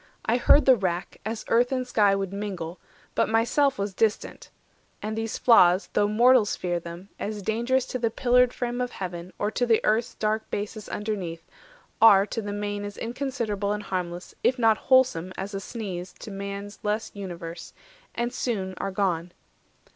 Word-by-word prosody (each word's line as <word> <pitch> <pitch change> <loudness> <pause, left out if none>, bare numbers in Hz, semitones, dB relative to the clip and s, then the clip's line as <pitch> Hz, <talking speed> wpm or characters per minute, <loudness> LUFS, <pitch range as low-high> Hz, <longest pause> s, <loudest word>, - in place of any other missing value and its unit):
I 235 - +2
heard 285 +4 +5
the 260 - +7
wrack, 185 -4 -3
As 220 0 -4
earth 245 +2 +3
and 255 -1 -1
sky 205 -5 +3
would 195 -1 -3
mingle; 185 -4 -5 0.3
but - - +1
myself 240 +5 +2
Was 200 0 -2
distant; 215 +2 -1 0.5
and 215 +1 -4
these 225 0 -3
flaws, 185 -6 +5
though 205 - +3
mortals 235 +1 +4
fear 175 -1 -2
them, 170 +3 -9
As 210 -1 -4
dangerous 240 +5 +1
to 255 - -4
the 230 -1 +1
pillared 250 +1 +3
frame 245 0 -3
of 250 0 -3
Heaven, 180 -1 -6
Or 205 - -1
to 245 - 0
the 225 -2 +4
Earth's 225 +3 +1
dark 215 0 -1
basis 210 +1 -5
underneath, 185 -6 -4 0.6
Are 200 -3 +8
to 225 - -4
the 205 -1 -5
main 205 0 -3
as 205 -1 -7
inconsiderable 230 -5 -2
And 210 0 -4
harmless, 180 -2 -4
if 255 - +3
not 225 -3 +3
wholesome, 250 -10 +4
as 195 +2 -5
a 195 - -2
sneeze 190 -4 -6
To 215 - -9
man's 200 +1 -6
less 215 +1 -2
universe, 170 -4 -7 0.4
and 240 +1 -2
soon 195 -8 -2
are 195 - -2
gone. 180 -3 -1
210 Hz, 175 wpm, -26 LUFS, 190-235 Hz, 0.6 s, Are